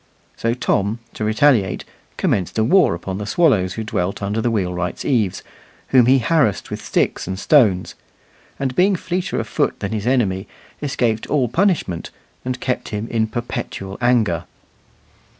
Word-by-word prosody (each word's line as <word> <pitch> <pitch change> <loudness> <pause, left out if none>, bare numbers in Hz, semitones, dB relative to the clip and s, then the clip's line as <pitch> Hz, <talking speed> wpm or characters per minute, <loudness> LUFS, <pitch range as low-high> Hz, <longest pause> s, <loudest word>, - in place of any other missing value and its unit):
So 115 +1 -1
Tom, 105 -3 0 0.2
to - - -5
retaliate, 110 -2 +2 0.3
commenced 95 +1 0
a 110 - +3
war 180 - +4
upon 95 +3 -5
the 105 - -5
swallows 105 - +2
who 110 - -4
dwelt 100 -2 -2
under 105 +3 -1
the 120 - +1
wheelwright's 90 -5 -2
eaves, 110 -9 0 0.5
whom 125 -3 +5
he 130 +1 +6
harassed 130 - +1
with - - -5
sticks - - 0
and 95 0 -3
stones; 100 -6 +3 0.6
and 130 -2 -2
being 190 +2 +4
fleeter 180 +1 -2
of - - -2
foot - - 0
than - - -3
his 110 0 -3
enemy, 100 -7 +1 0.3
escaped 120 -6 -1
all 135 -5 +1
punishment, 165 - 0 0.3
and 125 0 -3
kept 125 - -2
him 105 +1 -4
in 110 -1 +1
perpetual 115 -4 -5
anger. 115 -9 +2
110 Hz, 155 wpm, -20 LUFS, 100-130 Hz, 0.6 s, he